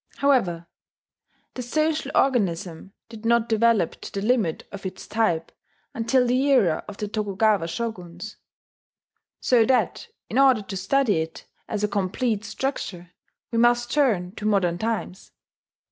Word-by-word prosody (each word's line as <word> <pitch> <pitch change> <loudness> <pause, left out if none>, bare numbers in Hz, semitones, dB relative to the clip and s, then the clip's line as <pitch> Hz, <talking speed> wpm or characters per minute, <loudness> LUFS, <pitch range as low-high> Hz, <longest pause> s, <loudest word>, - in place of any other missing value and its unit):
However, 190 -12 +1 0.9
the 255 - -5
social 310 +3 -1
organism 190 -8 0 0.2
did 225 -1 -11
not 235 0 +2
develop 225 -5 +2
to - - -8
the 195 - -4
limit 215 -8 0
of 200 - -8
its 190 - -6
type 195 -8 0 0.4
until 250 +3 +2
the 250 +2 +2
era 215 - +3
of 205 - -8
the 210 - -3
Tokugawa 205 -3 +1
shoguns, 185 -2 -6 1.0
so 245 -3 +4
that, 255 - +1 0.2
in 245 - 0
order 260 -6 +5
to 195 0 -7
study 210 +2 +1
it 160 0 -4 0.2
as 210 -1 -3
a - - +3
completed 205 +3 -1
structure, 195 -7 -4 0.4
we 230 - 0
must 240 0 +3
turn 220 -12 +2
to 210 - -6
modern 180 -5 +1
times. 220 -4 -4
215 Hz, 140 wpm, -24 LUFS, 185-245 Hz, 1.0 s, order